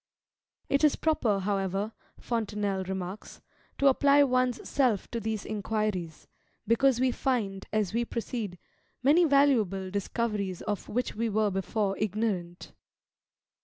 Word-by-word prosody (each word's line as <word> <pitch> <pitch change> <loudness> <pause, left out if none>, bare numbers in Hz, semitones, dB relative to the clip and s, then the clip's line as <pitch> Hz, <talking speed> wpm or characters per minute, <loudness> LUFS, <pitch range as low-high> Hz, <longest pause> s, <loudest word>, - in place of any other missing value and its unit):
"It 280 +2 +1
is 300 - +5
proper, 235 -11 +1
however," 195 +1 -1 0.3
Fontenelle 210 -4 -2
remarks, 190 +1 -6 0.4
"to 280 - 0
apply 280 +1 +5
one's 255 -2 +1
self 245 -8 +1
to 235 - -2
these 220 -1 -3
inquiries; 210 -6 -3 0.4
because 245 +2 +3
we 255 0 +3
find, 210 -8 -2
as 215 -3 0
we 235 +1 +1
proceed, 230 -5 -4 0.5
many 310 +6 +5
valuable 230 - +3
discoveries 200 -2 -2
of 205 -2 -3
which 250 +3 -1
we 230 +1 -1
were 215 0 +1
before 195 +1 -1
ignorant." 200 -4 -2
215 Hz, 125 wpm, -28 LUFS, 195-250 Hz, 0.5 s, is